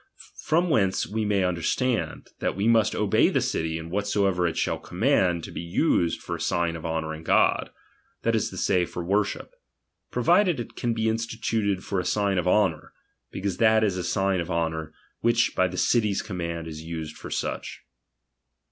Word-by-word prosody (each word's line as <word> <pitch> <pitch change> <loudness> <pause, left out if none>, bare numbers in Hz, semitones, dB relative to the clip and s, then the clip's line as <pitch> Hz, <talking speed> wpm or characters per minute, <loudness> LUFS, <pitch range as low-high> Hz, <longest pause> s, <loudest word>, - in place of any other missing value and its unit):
From 170 +2 +1
whence 95 -7 +2
we 110 +1 -2
may 100 -2 +2
understand, 90 +8 -1
that - - -1
we 100 +3 0
must 110 -2 +3
obey 105 -2 +3
the - - +1
city 80 0 -1
in 80 +1 -8
whatsoever 100 -2 +1
it 85 - -3
shall - - 0
command 85 -3 +1
to - - -7
be - - -5
used 85 - +1
for - - -3
a - - -7
sign 85 -1 0
of 80 0 -5
honouring 80 -1 -3
God, 80 - +2 0.5
that - - +2
is - - +1
to - - -9
say, 90 - +2
for 85 - -6
worship; 100 - -1 0.6
provided 185 -9 +3
it 120 - -7
can 120 -1 -1
be 110 0 0
instituted 110 -3 -1
for 100 - -2
a - - -1
sign 100 -2 +1
of 90 - -2
honour; 90 -5 +1 0.4
because 95 -2 -3
that 110 -1 +4
is 100 -4 +1
a 90 - -3
sign 95 +1 +1
of 85 - -6
honour, 80 -2 -2 0.3
which 115 0 +2
by 90 - +3
the 90 +1 -7
city's 105 -3 +2
command 85 -4 -4
is 80 -1 -7
used 80 -2 -6
for - - -9
such. - - -4
95 Hz, 185 wpm, -26 LUFS, 85-110 Hz, 0.6 s, that